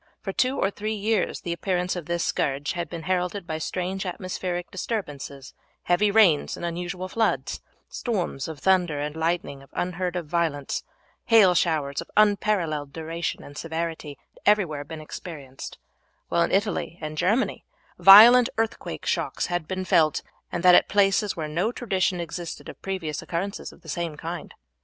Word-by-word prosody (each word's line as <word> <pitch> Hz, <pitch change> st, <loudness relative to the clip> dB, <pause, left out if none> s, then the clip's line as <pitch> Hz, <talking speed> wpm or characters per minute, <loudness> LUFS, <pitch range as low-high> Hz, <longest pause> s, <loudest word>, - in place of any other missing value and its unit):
For 195 Hz, -, -5 dB
two 255 Hz, +5 st, +1 dB
or 195 Hz, -, +1 dB
three 215 Hz, +2 st, -3 dB
years 210 Hz, 0 st, 0 dB
the 170 Hz, -, -3 dB
appearance 180 Hz, +1 st, -1 dB
of 175 Hz, -4 st, -6 dB
this 170 Hz, 0 st, -1 dB
scourge 140 Hz, +1 st, -1 dB
had 175 Hz, -3 st, -4 dB
been 165 Hz, -1 st, -6 dB
heralded 180 Hz, +2 st, -1 dB
by 160 Hz, -2 st, -4 dB
strange 185 Hz, +3 st, -3 dB
atmospheric 180 Hz, -1 st, -4 dB
disturbances; 145 Hz, -, -5 dB, 0.3 s
heavy 190 Hz, +4 st, +3 dB
rains 200 Hz, -8 st, +4 dB
and -, -, -5 dB
unusual 175 Hz, +2 st, -4 dB
floods, 225 Hz, +3 st, 0 dB, 0.3 s
storms 185 Hz, -, -3 dB
of 160 Hz, -2 st, -6 dB
thunder 175 Hz, -1 st, +2 dB
and 150 Hz, +1 st, -3 dB
lightning 160 Hz, -3 st, -1 dB
of 135 Hz, -, -17 dB
unheard 180 Hz, 0 st, -2 dB
of 175 Hz, -2 st, -2 dB
violence, 150 Hz, -3 st, -1 dB, 0.4 s
hail 220 Hz, -6 st, +6 dB
showers 155 Hz, -5 st, 0 dB
of -, -, -11 dB
unparalleled 195 Hz, -9 st, +2 dB
duration 165 Hz, +2 st, -4 dB
and 145 Hz, 0 st, -9 dB
severity, 160 Hz, -3 st, -4 dB, 0.2 s
had -, -, -20 dB
everywhere 180 Hz, -9 st, +2 dB
been 155 Hz, +2 st, -8 dB
experienced, 145 Hz, -4 st, -8 dB, 0.5 s
while 170 Hz, -, +2 dB
in 170 Hz, -, +2 dB
Italy 200 Hz, -3 st, 0 dB
and 155 Hz, -1 st, -5 dB
Germany 195 Hz, +10 st, +1 dB, 0.4 s
violent 230 Hz, +5 st, +10 dB
earthquake 225 Hz, 0 st, -3 dB
shocks -, -, -1 dB
had 175 Hz, -3 st, -1 dB
been 185 Hz, 0 st, -3 dB
felt, 155 Hz, -4 st, +3 dB, 0.3 s
and 175 Hz, -, -3 dB
that 180 Hz, -1 st, +8 dB
at -, -, +6 dB
places 200 Hz, 0 st, +2 dB
where 160 Hz, -2 st, -3 dB
no 175 Hz, +9 st, 0 dB
tradition 190 Hz, -7 st, 0 dB
existed 170 Hz, 0 st, -6 dB
of -, -, -11 dB
previous 175 Hz, -6 st, -3 dB
occurrences 190 Hz, +4 st, -4 dB
of -, -, -19 dB
the -, -, -15 dB
same 170 Hz, -3 st, -3 dB
kind. 165 Hz, +1 st, -6 dB
175 Hz, 165 wpm, -25 LUFS, 160-195 Hz, 0.5 s, violent